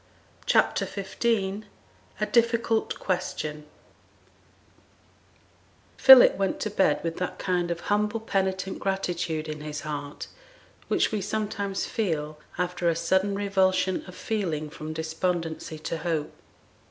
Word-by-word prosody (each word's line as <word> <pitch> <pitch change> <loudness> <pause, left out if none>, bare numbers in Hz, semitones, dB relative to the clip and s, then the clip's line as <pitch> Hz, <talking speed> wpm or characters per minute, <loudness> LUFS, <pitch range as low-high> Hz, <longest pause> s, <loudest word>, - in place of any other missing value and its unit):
CHAPTER - - +3
XV 200 +3 -6 0.9
A - - +1
DIFFICULT 235 -1 +1
QUESTION 155 -5 -3 2.3
Philip 265 -1 +9
went 195 -1 -1
to 215 - -2
bed 190 -7 +2
with 165 -1 -3
that 180 - -3
kind 180 -2 0
of 170 0 -3
humble 210 +2 0
penitent 190 -3 -1
gratitude 175 -5 -2
in 155 -1 -5
his 150 -1 -5
heart, 145 -1 -5 0.6
which - - +2
we 215 -2 -1
sometimes 205 -1 -2
feel 155 -8 -2 0.2
after 180 -1 0
a 165 - +1
sudden 190 +4 +1
revulsion 190 -2 +1
of 180 - -10
feeling 165 -9 -2
from 155 +1 -7
despondency 160 0 -3
to 160 +1 -4
hope. 155 -2 -2
180 Hz, 115 wpm, -26 LUFS, 160-200 Hz, 2.3 s, Philip